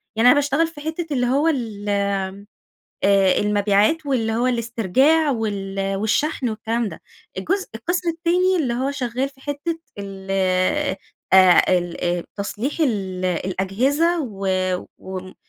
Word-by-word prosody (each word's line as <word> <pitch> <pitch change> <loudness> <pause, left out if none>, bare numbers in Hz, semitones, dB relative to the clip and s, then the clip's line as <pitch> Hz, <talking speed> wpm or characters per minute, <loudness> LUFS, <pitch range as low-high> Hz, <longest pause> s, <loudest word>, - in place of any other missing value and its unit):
يعني 225 +3 +4
أنا 270 - +7
باشتغل 290 +3 +2
في 310 -3 -11
حتة 320 0 -4
اللي 250 -2 +1
هو 280 +5 +2
ال 225 -9 -2 1.2
آآ، 195 -1 +4
المبيعات 210 +9 +2
واللي 230 -5 0
هو 235 +3 +1
الاسترجاع 250 - +2
وال 195 -4 -2
والشحن 250 +6 0
والكلام 225 +1 -2
ده، - - -10 0.4
الجزء 380 - -1
القسم 345 +9 -2
التاني 350 +3 +2
اللي 255 -8 0
هو 265 +3 -1
شغال 260 -1 -2
في 270 -1 -22
حتة 290 +4 -3 0.2
ال 195 -1 -8 1.0
آآ، 185 -2 +7 0.2
ال 175 0 -3
تصليح 210 +6 -3
الأجهزة 195 - 0
و 200 -6 -4 0.5
وم 185 0 -8
235 Hz, 125 wpm, -22 LUFS, 195-290 Hz, 1.2 s, أنا